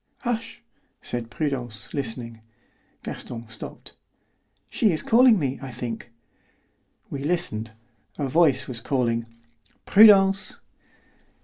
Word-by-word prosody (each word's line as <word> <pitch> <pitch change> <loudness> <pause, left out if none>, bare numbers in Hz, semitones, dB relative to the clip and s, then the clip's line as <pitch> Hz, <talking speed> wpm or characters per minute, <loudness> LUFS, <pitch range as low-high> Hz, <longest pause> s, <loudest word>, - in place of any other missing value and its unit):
"Hush," 230 -2 -4 0.4
said 120 -2 -4
Prudence, 120 -7 -3
listening. 115 -4 -4 0.6
Gaston 115 -1 -7
stopped. 110 - -10 0.7
"She 215 - +2
is 155 - -1
calling 240 -1 +6
me, 135 -5 -2
I 135 - -7
think." 120 -1 -6 1.0
We 140 -1 -5
listened. 140 -10 -1 0.4
A 145 - -1
voice 140 -2 +3
was 120 -3 -4
calling, 115 -3 -1 0.6
"Prudence!" 195 -2 +6
135 Hz, 100 wpm, -24 LUFS, 115-180 Hz, 1.0 s, calling